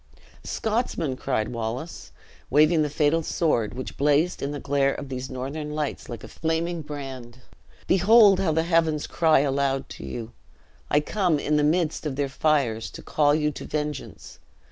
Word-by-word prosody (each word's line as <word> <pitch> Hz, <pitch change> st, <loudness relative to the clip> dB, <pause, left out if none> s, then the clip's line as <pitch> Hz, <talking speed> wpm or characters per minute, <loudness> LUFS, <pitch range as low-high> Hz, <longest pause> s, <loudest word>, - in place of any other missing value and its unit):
"Scotsmen!" 215 Hz, -, -1 dB
cried 130 Hz, -5 st, -1 dB
Wallace, 120 Hz, +7 st, -5 dB, 0.4 s
waving 155 Hz, +3 st, +4 dB
the 150 Hz, -, 0 dB
fatal 150 Hz, +2 st, +2 dB
sword, 135 Hz, -10 st, 0 dB
which 130 Hz, -, -6 dB
blazed 150 Hz, +5 st, +2 dB
in 140 Hz, -, -2 dB
the 145 Hz, 0 st, -4 dB
glare 140 Hz, -1 st, +1 dB
of 140 Hz, -, -7 dB
these 130 Hz, 0 st, -5 dB
northern 145 Hz, +4 st, -5 dB
lights 150 Hz, -2 st, -3 dB
like 120 Hz, -, -7 dB
a -, -, -8 dB
flaming 165 Hz, +1 st, -2 dB
brand, 130 Hz, -5 st, -8 dB, 0.4 s
"behold 200 Hz, +1 st, +6 dB
how 190 Hz, -4 st, +1 dB
the 160 Hz, +1 st, +1 dB
heavens 165 Hz, -3 st, +1 dB
cry 160 Hz, -4 st, +3 dB
aloud 135 Hz, -1 st, 0 dB
to -, -, -9 dB
you! 110 Hz, -, -6 dB, 0.6 s
I 150 Hz, -, +3 dB
come, 180 Hz, -1 st, +1 dB
in 150 Hz, +1 st, 0 dB
the 150 Hz, -, +2 dB
midst 160 Hz, 0 st, +1 dB
of 140 Hz, -, -3 dB
their 140 Hz, 0 st, -1 dB
fires, 135 Hz, -7 st, 0 dB
to -, -, -11 dB
call 145 Hz, -1 st, +2 dB
you 150 Hz, -1 st, +1 dB
to -, -, -8 dB
vengeance. 150 Hz, -2 st, -5 dB
150 Hz, 165 wpm, -25 LUFS, 135-160 Hz, 0.6 s, behold